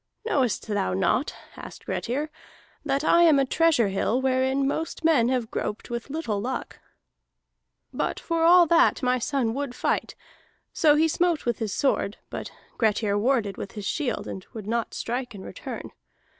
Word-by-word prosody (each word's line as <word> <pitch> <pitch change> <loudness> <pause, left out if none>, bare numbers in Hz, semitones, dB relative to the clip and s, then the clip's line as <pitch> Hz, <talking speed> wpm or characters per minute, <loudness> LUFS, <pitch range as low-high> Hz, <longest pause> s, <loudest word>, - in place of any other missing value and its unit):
"'Knowest 265 - 0
thou 205 -3 0
not,' 195 - +1 0.2
asked - - -10
Grettir, 290 +6 -2 0.5
'that 280 -1 0
I 340 +2 +5
am 320 -4 +6
a 275 - +3
treasure 300 -7 +3
hill 205 +5 0
wherein 265 +1 +1
most 320 +3 -3
men 265 -8 +4
have 250 -4 -1
groped 210 - -4
with 235 +3 -4
little 270 -9 -2
luck?' 255 +4 -4 1.1
"But - - -2
for 330 -1 -1
all 350 +1 +7
that 335 -3 +3
my 250 0 +2
son 245 -3 0
would 275 -1 -4
fight. - - -1 0.6
So 300 -3 +4
he 315 +2 +4
smote 340 0 +1
with 240 -2 -1
his 220 -3 -2
sword, 215 -3 0
but - - -5 0.3
Grettir 215 -2 +2
warded 215 -2 +1
with 195 - -7
his 210 -2 -6
shield 275 +3 -2
and 190 - -6
would 220 -4 -7
not 230 +2 -2
strike 245 -1 -3
in 190 - -9
return. - - -7
255 Hz, 165 wpm, -25 LUFS, 225-300 Hz, 1.1 s, all